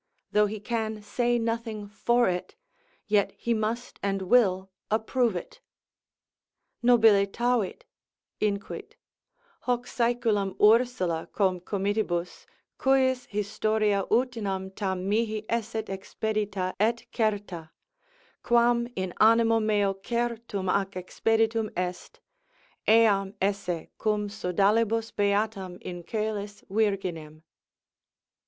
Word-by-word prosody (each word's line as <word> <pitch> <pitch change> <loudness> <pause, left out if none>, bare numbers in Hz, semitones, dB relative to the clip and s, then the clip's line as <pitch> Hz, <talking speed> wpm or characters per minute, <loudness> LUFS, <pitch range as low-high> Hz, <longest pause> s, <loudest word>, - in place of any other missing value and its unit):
though 210 0 +4
he 215 +1 -5
can 220 0 -2
say 240 +3 0
nothing 230 -2 -3
for 235 +3 +2
it, 180 -1 -3 0.5
yet 205 -1 +2
he 235 - 0
must 225 +2 -3
and 195 -1 -1
will 190 -3 +3 0.2
approve 225 0 +1
it: 175 - -7 1.2
nobilitavit 225 -1 +3 0.6
(inquit) 215 - -3 0.6
hoc 245 -1 -1
saeculum 230 -6 0
Ursula 215 -7 +3
cum 185 -3 +1
comitibus, 195 -2 -2 0.3
cujus 260 -2 +2
historia 210 0 0
utinam 210 -6 -1
tam 190 -2 -2
mihi 215 0 0
esset 225 -1 -2
expedita 195 -1 -3
et 230 +3 +1
certa, 205 -7 -1 0.7
quam 235 0 +3
in 185 -2 -3
animo 225 +1 +5
meo 205 -2 +2
certum 230 -1 -3
ac 195 +1 0
expeditum 225 +3 0
est, 180 0 -4 0.7
eam 205 -3 +4
esse 195 -4 -1
cum 210 -1 0
sodalibus 215 +3 +1
beatam 200 -2 0
in 175 -1 -6
coelis 210 0 -4
virginem. 185 -7 -1
210 Hz, 95 wpm, -27 LUFS, 195-230 Hz, 1.2 s, animo